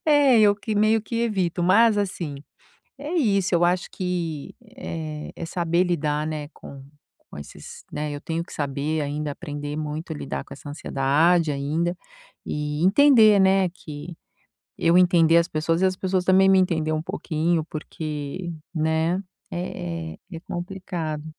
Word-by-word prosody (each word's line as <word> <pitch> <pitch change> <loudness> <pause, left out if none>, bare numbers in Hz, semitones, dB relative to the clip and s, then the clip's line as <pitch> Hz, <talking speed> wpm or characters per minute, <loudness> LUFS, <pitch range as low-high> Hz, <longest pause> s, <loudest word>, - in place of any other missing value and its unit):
É, 285 -6 +5
eu 205 -1 +5
que 210 +1 -4
meio 215 +2 +3
que 230 +2 -5
evito. 185 -6 0
Mas 210 +4 +5
assim, 175 -7 -3 0.6
é 295 +5 -5
isso, 200 - +2
eu 175 0 +4
acho 175 0 +1
que, 170 -5 -4 0.2
eh, 155 -10 -6
é 170 - -6
saber 170 +1 +1
lidar, 155 -4 -1
né, 150 -2 -4
com 135 -1 -11 0.5
com - - -9
esses, 75 - -10
né, 150 0 -3
eu 145 - -5
tenho 165 +2 -3
que - - -14
saber 145 +2 -2
ainda 145 +1 -3
aprender 145 -2 -6
muito 155 +2 -4
a - - -5
lidar 70 - -5
com - - -13
essa - - -11
ansiedade 150 +4 +2
ainda 160 +5 -1 0.5
e 150 +2 -2
entender, 220 -2 +6
né, 190 -1 +4
que 160 -1 -9 0.6
eu 170 +2 +4
entender 170 -2 +5
as 170 +1 +1
pessoas 165 +2 0
e - - +5
as 185 -1 0
pessoas 185 -1 -1
também 190 +1 +5
me 190 0 +6
entender 160 -4 +1
um 155 0 -1
pouquinho. 160 0 -1
Porque, 155 +2 -5 0.2
né, 160 +3 +1 0.3
é 85 - -5
é - - -16 0.2
é - - -8
complicado. 175 -4 -5
170 Hz, 160 wpm, -24 LUFS, 150-185 Hz, 0.6 s, entender